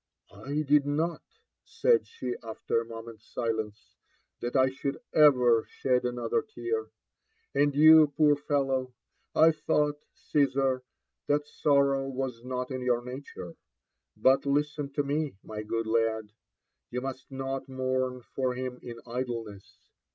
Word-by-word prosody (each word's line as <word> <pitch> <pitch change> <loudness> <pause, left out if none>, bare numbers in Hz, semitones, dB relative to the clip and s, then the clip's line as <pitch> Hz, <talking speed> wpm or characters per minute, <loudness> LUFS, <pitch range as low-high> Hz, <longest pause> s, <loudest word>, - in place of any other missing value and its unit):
*'I 140 +10 -3
did 145 0 +3
not 160 +3 -1
think," 450 - -40 0.2
said 475 -2 +2
she 125 -1 -4
after 115 0 -2
a - - -7
moment's 115 -1 -10
silence, 110 -2 -3 0.5
''that 120 +2 -3
I 130 0 +4
should 140 +1 -4
ever 125 -7 +6
shed 125 -2 0
another 125 - 0
tear. 435 0 -4 0.6
And 145 -1 +2
you, 155 +1 +8
poor 145 0 +3
fellow 135 -3 -1 0.4
I 160 - +7
I - - +4
thought, 150 -1 0 0.2
Caesar, 135 -3 +1 0.5
t}iat 145 0 +1
sor 140 -2 +3
row 135 0 -1
was 130 -3 -4
not 125 +1 -4
in 130 -1 -3
your 120 -1 0
nature. 125 -9 -8 0.6
But 135 +2 +3
listen 145 0 0
to 145 - 0
me, 145 -2 -1
my 105 -1 -6
good 115 +1 -2
lad: 110 -1 0 0.6
you 125 +1 -3
IBUst 130 0 -5
not 135 0 -4
mourn 130 -1 -1
for 130 0 -2
him 125 0 -5
in 115 -1 -8
idleness. 115 -5 -6
130 Hz, 145 wpm, -29 LUFS, 120-145 Hz, 0.6 s, you